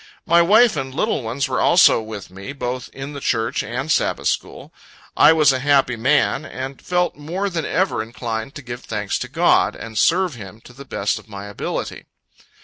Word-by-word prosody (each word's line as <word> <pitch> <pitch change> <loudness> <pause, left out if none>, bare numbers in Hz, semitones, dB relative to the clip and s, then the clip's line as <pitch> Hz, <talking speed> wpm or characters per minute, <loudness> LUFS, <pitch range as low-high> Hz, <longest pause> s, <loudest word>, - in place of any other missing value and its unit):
My 170 -2 +5
wife 215 +6 +5
and 135 -2 -4
little 215 -1 0
ones 125 +4 -2
were 130 -1 -1
also 175 -8 +5
with 110 -4 -8
me, 100 +8 -8
both 125 -2 -4
in 135 +2 -7
the 140 - -6
church 115 -3 -1
and 130 +7 -4
Sabbath - - +1
school. - - -5 0.4
I - - +7
was 155 -3 +5
a 130 - -1
happy 135 -2 +2
man, 135 +6 +1
and 135 -2 -7
felt 180 0 0
more 180 +7 -3
than 165 -3 -2
ever 185 - 0
inclined 115 +2 -5
to 145 - -8
give 120 0 -7
thanks 105 -2 -3
to - - -4
God, - - +2
and 115 -1 -9
serve 180 -1 +3
Him 105 -3 -10
to 125 - -15
the 140 +3 -12
best 105 -5 -2
of - - -19
my 100 -1 -8
ability. 100 0 -5
135 Hz, 195 wpm, -20 LUFS, 115-155 Hz, 0.4 s, I